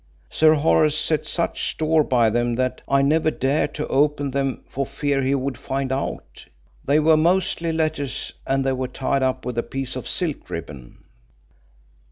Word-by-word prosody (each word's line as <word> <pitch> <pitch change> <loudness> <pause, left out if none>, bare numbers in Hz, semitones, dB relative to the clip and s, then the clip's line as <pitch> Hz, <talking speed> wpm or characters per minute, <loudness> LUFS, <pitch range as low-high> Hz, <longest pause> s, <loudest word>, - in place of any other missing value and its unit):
Sir 155 0 +5
Horace 155 0 +3
set 155 -1 0
such 170 - -1
store 155 0 +2
by 120 -6 +2
them 120 +1 0
that 130 +1 -1
I 140 0 +3
never 155 +3 +3
dared 140 0 0
to 150 - -2
open 145 0 +1
them 135 0 -2
for 140 - -3
fear 140 0 -1
he 135 +1 +1
would 135 -2 -3
find 135 -1 -3
out. 135 +1 -5 0.4
They 145 +3 +3
were 160 +1 +5
mostly 170 0 +1
letters 155 -4 -2
and 135 0 +1
they 135 - +1
were 130 0 -2
tied 135 +1 -1
up 130 -2 -1
with 125 -2 -2
a - - +2
piece 135 +1 -5
of 130 - -5
silk 165 -5 -2
ribbon." 70 -6 -8
140 Hz, 175 wpm, -22 LUFS, 130-155 Hz, 0.4 s, Sir